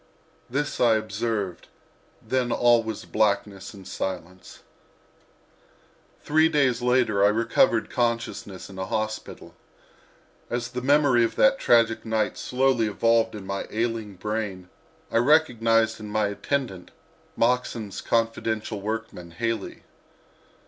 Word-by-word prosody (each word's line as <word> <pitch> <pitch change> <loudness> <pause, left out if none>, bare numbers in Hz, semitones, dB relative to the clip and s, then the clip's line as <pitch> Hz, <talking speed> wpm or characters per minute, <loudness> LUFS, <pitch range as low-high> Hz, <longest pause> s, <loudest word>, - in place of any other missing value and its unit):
This 140 +3 -2
I 115 -2 +5
observed, 110 -3 -3 0.6
then 130 -2 0
all 120 -1 +4
was 110 -2 -6
blackness 100 -2 -1
and 95 -3 -12
silence. 90 -1 -6 1.6
Three 155 +2 +3
days 140 -6 +2
later 120 -5 +2
I - - +7
recovered 115 +1 +2
consciousness 115 -5 -2
in 95 -1 -10
a 95 - -3
hospital. 110 0 -4 1.0
As 120 0 -3
the 125 0 -5
memory 140 -3 +4
of 115 - -1
that 270 0 +4
tragic 115 -2 +3
night 110 -1 -1
slowly 130 -3 +1
evolved 115 +1 +2
in 100 -2 -8
my 100 0 -4
ailing 110 -2 -2
brain 100 -2 -4 0.4
recognized 115 -5 +3
in 105 -1 -8
my 105 0 0
attendant 100 -3 -3 0.5
Moxon's 115 -4 0
confidential 110 -2 -1
workman, 110 -4 -5
Haley. 110 +4 -4
115 Hz, 115 wpm, -25 LUFS, 105-120 Hz, 1.6 s, I